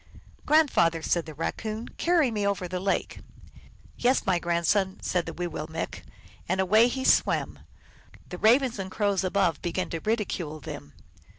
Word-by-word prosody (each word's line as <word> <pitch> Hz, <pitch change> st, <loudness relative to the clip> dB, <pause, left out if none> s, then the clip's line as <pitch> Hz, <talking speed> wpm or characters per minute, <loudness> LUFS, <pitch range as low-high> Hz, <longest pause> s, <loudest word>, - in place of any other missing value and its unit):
" -, -, -27 dB
Grandfather," 215 Hz, -, +3 dB
said 170 Hz, -1 st, 0 dB
the 155 Hz, -, -9 dB
Raccoon, 215 Hz, +8 st, -4 dB
" -, -, -25 dB
carry 335 Hz, -7 st, +3 dB
me 210 Hz, -2 st, -2 dB
over 195 Hz, -2 st, -1 dB
the 180 Hz, +1 st, -4 dB
lake." 195 Hz, +1 st, -1 dB, 0.4 s
" -, -, -23 dB, 0.3 s
Yes, 255 Hz, +2 st, +2 dB
my 185 Hz, -3 st, +2 dB
grand 170 Hz, 0 st, -1 dB
son," 195 Hz, +1 st, +1 dB
said 180 Hz, -2 st, -1 dB
the -, -, -3 dB
Wiwillmekq, 165 Hz, -2 st, -5 dB, 0.5 s
and 185 Hz, +1 st, 0 dB
away 215 Hz, +5 st, +5 dB
he 260 Hz, +2 st, -3 dB
swam; -, -, +2 dB, 0.7 s
the 180 Hz, -, -7 dB
Ravens 240 Hz, +1 st, +3 dB
and 190 Hz, -1 st, -4 dB
Crows 200 Hz, -1 st, 0 dB
above 185 Hz, -5 st, +1 dB
began 175 Hz, +1 st, -3 dB
to 165 Hz, -, -3 dB
ridicule 190 Hz, -8 st, -2 dB
them. 75 Hz, -, -9 dB
190 Hz, 170 wpm, -27 LUFS, 170-220 Hz, 0.7 s, away